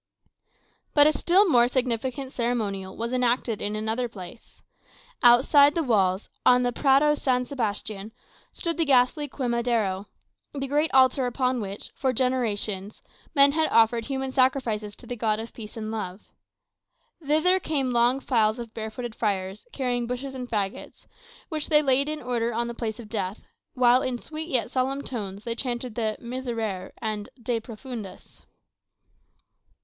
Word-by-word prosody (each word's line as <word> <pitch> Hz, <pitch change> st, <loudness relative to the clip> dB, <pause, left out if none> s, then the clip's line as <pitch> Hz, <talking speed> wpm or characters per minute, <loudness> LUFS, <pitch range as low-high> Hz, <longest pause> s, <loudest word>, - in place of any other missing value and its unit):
But 290 Hz, -1 st, +7 dB
a 305 Hz, -, +6 dB
still 375 Hz, +7 st, +4 dB
more 240 Hz, -7 st, +5 dB
significant 255 Hz, +1 st, -2 dB
ceremonial 210 Hz, -7 st, -2 dB
was 235 Hz, +2 st, -3 dB
enacted 245 Hz, -3 st, 0 dB
in 210 Hz, +1 st, -1 dB
another 220 Hz, +3 st, -1 dB
place. 200 Hz, +2 st, -12 dB, 0.6 s
Outside 275 Hz, +4 st, +6 dB
the 335 Hz, -, +1 dB
walls, 195 Hz, -6 st, +1 dB, 0.2 s
on 250 Hz, 0 st, +5 dB
the 245 Hz, -, +1 dB
Prado 280 Hz, +4 st, +4 dB
San 255 Hz, -4 st, 0 dB
Sebastian, 215 Hz, -4 st, -3 dB, 0.4 s
stood 335 Hz, -1 st, -2 dB
the 330 Hz, -, +2 dB
ghastly 275 Hz, +2 st, +3 dB
Quemadero 235 Hz, -7 st, -1 dB, 0.5 s
the 275 Hz, -1 st, -2 dB
great 295 Hz, +3 st, +1 dB
altar 260 Hz, 0 st, +4 dB
upon 255 Hz, 0 st, 0 dB
which, 200 Hz, 0 st, -6 dB
for 260 Hz, -2 st, -1 dB
generations, 220 Hz, -5 st, -1 dB, 0.3 s
men 280 Hz, 0 st, +7 dB
had 315 Hz, +2 st, +1 dB
offered 230 Hz, 0 st, +3 dB
human 265 Hz, 0 st, -3 dB
sacrifices 240 Hz, -6 st, +1 dB
to -, -, -16 dB
the 245 Hz, -, -5 dB
God 215 Hz, -2 st, 0 dB
of 225 Hz, +1 st, -7 dB
peace 215 Hz, -1 st, -10 dB
and 215 Hz, -1 st, -4 dB
love. 205 Hz, -3 st, -5 dB, 1.0 s
Thither 315 Hz, +6 st, +3 dB
came 280 Hz, -7 st, -1 dB
long 240 Hz, +2 st, +3 dB
files 225 Hz, -4 st, +2 dB
of 235 Hz, -2 st, -8 dB
barefooted 220 Hz, +2 st, -5 dB
friars, 195 Hz, -, -2 dB
carrying 245 Hz, -, -1 dB
bushes 255 Hz, +2 st, -4 dB
and 250 Hz, -2 st, -6 dB
faggots, 200 Hz, -3 st, -4 dB, 0.4 s
which 310 Hz, -2 st, -4 dB
they 300 Hz, -1 st, +5 dB
laid 275 Hz, +1 st, +2 dB
in 305 Hz, -2 st, -5 dB
order 240 Hz, -1 st, -1 dB
on 235 Hz, +1 st, -1 dB
the 235 Hz, -, -4 dB
place 230 Hz, -1 st, -4 dB
of 230 Hz, -, -9 dB
death, 205 Hz, -2 st, -4 dB, 0.3 s
while, 250 Hz, 0 st, +5 dB
in 255 Hz, -2 st, -2 dB
sweet 315 Hz, +5 st, -6 dB
yet 250 Hz, -5 st, 0 dB
solemn 270 Hz, +2 st, -1 dB
tones, 205 Hz, -5 st, -5 dB
they 230 Hz, -, -2 dB
chanted 245 Hz, -1 st, -3 dB
the 220 Hz, -1 st, -1 dB
"Miserere" 230 Hz, -6 st, -4 dB
and 215 Hz, -2 st, -3 dB
"De 235 Hz, 0 st, -1 dB
Profundis." 225 Hz, -2 st, -9 dB
240 Hz, 155 wpm, -26 LUFS, 220-265 Hz, 1.0 s, But